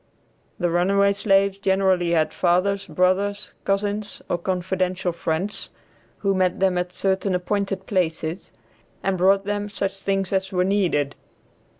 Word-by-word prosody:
The 175 Hz, -2 st, 0 dB
runaway 200 Hz, +3 st, +3 dB
slaves 200 Hz, -1 st, +2 dB
generally 190 Hz, -3 st, +2 dB
had 155 Hz, -2 st, +2 dB
fathers, 190 Hz, +3 st, +1 dB
brothers, 185 Hz, +5 st, 0 dB
cousins, 205 Hz, +1 st, -1 dB
or 175 Hz, -, 0 dB
confidential 185 Hz, 0 st, -1 dB
friends 170 Hz, +4 st, -2 dB, 0.5 s
who 195 Hz, -1 st, +1 dB
met 185 Hz, -1 st, +1 dB
them 185 Hz, -2 st, +2 dB
at 180 Hz, 0 st, -3 dB
certain 190 Hz, 0 st, 0 dB
appointed 195 Hz, +1 st, -2 dB
places, 170 Hz, -2 st, -2 dB, 0.5 s
and 195 Hz, -1 st, +1 dB
brought 195 Hz, +2 st, +3 dB
them 205 Hz, 0 st, -2 dB
such 195 Hz, -1 st, -3 dB
things 195 Hz, 0 st, -1 dB
as 190 Hz, 0 st, 0 dB
were 180 Hz, -1 st, +2 dB
needed. 180 Hz, -8 st, +1 dB
190 Hz, 130 wpm, -23 LUFS, 180-200 Hz, 0.5 s, runaway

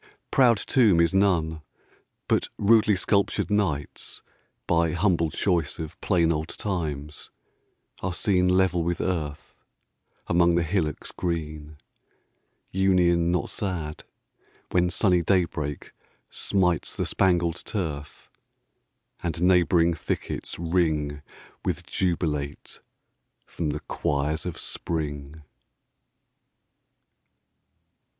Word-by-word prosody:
Proud 120 Hz, -4 st, +5 dB
tomb 105 Hz, -6 st, +3 dB
is 85 Hz, +2 st, +3 dB
none; 85 Hz, -5 st, +2 dB, 0.7 s
but -, -, +1 dB
rudely 110 Hz, 0 st, +4 dB
sculptured 100 Hz, +2 st, +1 dB
knights, 85 Hz, -9 st, -2 dB, 0.4 s
By 85 Hz, -1 st, +2 dB
humble 85 Hz, -3 st, +2 dB
choice 85 Hz, -2 st, 0 dB
of 80 Hz, -2 st, -7 dB
plain 85 Hz, -2 st, +2 dB
old 75 Hz, 0 st, -3 dB
times, 75 Hz, -8 st, -4 dB, 0.7 s
are 95 Hz, -, -1 dB
seen 90 Hz, 0 st, +1 dB
10 90 Hz, 0 st, +3 dB
Level 95 Hz, -2 st, +2 dB
with 85 Hz, +1 st, -1 dB
earth, 75 Hz, -5 st, -3 dB, 0.7 s
among 85 Hz, 0 st, +3 dB
the 85 Hz, -, +2 dB
hillocks 85 Hz, -3 st, -2 dB
green: 75 Hz, -3 st, -4 dB, 0.9 s
Union 90 Hz, -3 st, +3 dB
not 90 Hz, -4 st, -1 dB
sad, 85 Hz, -6 st, -4 dB, 0.7 s
when 90 Hz, -1 st, +3 dB
sunny 90 Hz, -1 st, +2 dB
daybreak 85 Hz, -5 st, -1 dB, 0.4 s
smites 90 Hz, -4 st, 0 dB
The -, -, -1 dB
spangled 85 Hz, -2 st, +1 dB
turf, 75 Hz, -8 st, -5 dB, 0.9 s
and 85 Hz, -2 st, -2 dB
neighbouring 85 Hz, -1 st, +4 dB
thickets 80 Hz, -, -4 dB
ring 80 Hz, -4 st, 0 dB, 0.4 s
With -, -, -2 dB
jubilate 75 Hz, -5 st, -2 dB, 0.7 s
from 80 Hz, -3 st, -3 dB
the 75 Hz, +1 st, -3 dB
choirs 75 Hz, +4 st, -2 dB
of 85 Hz, -, -5 dB
spring! 75 Hz, -2 st, -4 dB
85 Hz, 100 wpm, -26 LUFS, 75-90 Hz, 0.9 s, Proud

